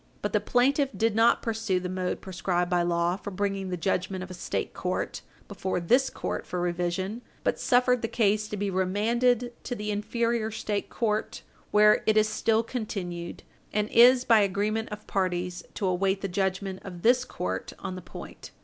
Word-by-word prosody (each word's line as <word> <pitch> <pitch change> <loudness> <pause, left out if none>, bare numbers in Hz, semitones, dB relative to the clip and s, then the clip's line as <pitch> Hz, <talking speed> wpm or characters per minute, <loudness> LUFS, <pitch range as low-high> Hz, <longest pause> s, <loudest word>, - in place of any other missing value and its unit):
But - - -2
the - - +4
plaintiff 270 +3 +2
did 225 -1 +2
not 230 +1 +4
pursue 220 -5 0
the 180 - -4
mode 185 0 -2
prescribed 180 -1 -1
by 175 -1 +3
law 170 +1 +1
for 205 - -7
bringing 195 -1 -2
the 180 - -2
judgment 185 +1 -1
of 185 - -9
a - - -5
State 180 - -3
court - - -3 0.3
before 185 -1 -2
this 250 +10 +3
court - - -4
for 180 - -3
revision, 180 +5 -2 0.2
but - - 0
suffered 250 -1 +3
the 225 - -1
case 215 -2 +1
to 210 - -5
be 200 0 -1
remanded 235 +6 +1
to 245 - -3
the 210 -1 -3
inferior 230 +2 0
State 210 -2 -3
court, 215 -2 -2 0.3
where 210 0 +5
it 220 0 +4
is 215 0 +5
still 220 +1 +1
continued, 190 -8 -5 0.3
and 210 0 0
is, 245 +2 +6
by 225 -2 +6
agreement 210 +3 0
of 210 0 -8
parties, 180 -2 -1
to 200 - -2
await 190 +1 +1
the 195 - -1
judgment 190 0 -2
of 180 -3 -9
this 245 +2 +5
court 95 - -4
on - - -5
the 185 - -7
point. 175 - -10
205 Hz, 185 wpm, -27 LUFS, 185-225 Hz, 0.3 s, is